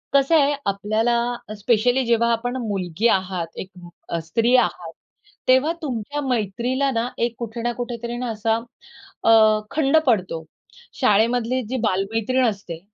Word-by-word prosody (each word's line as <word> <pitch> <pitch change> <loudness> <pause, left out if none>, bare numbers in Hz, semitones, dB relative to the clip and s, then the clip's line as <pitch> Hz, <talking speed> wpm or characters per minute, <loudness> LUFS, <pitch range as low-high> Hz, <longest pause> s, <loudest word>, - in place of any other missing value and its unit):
कसं 275 +4 +4
आहे 290 -1 +4
आपल्याला 215 +4 +1 0.4
स्पेशली 245 +4 +2
जेव्हा 235 0 +2
आपण 245 +3 -1
मुलगी 195 +1 -1
आहात, 185 -4 0
एक 190 - -6 0.4
अ, 170 - -1
स्त्री 230 +9 +2
आहात, 250 - +1 0.6
तेव्हा 260 +5 +4
तुमच्या 285 +1 -3
मैत्रीला 245 +4 0
ना 240 - -1 0.2
एक 235 -1 -4
कुठे 235 0 -5
ना 240 +1 0
कुठेतरी 240 0 -4
असा 220 0 0 0.7
अ, - - +5 0.4
खंड 305 0 +3
पडतो. 185 -8 +1 0.6
शाळेमधली 240 +2 +2
जी 260 - -1
बालमैत्रीण 225 +7 0
असते, 195 -6 -4
235 Hz, 130 wpm, -22 LUFS, 205-255 Hz, 0.7 s, अ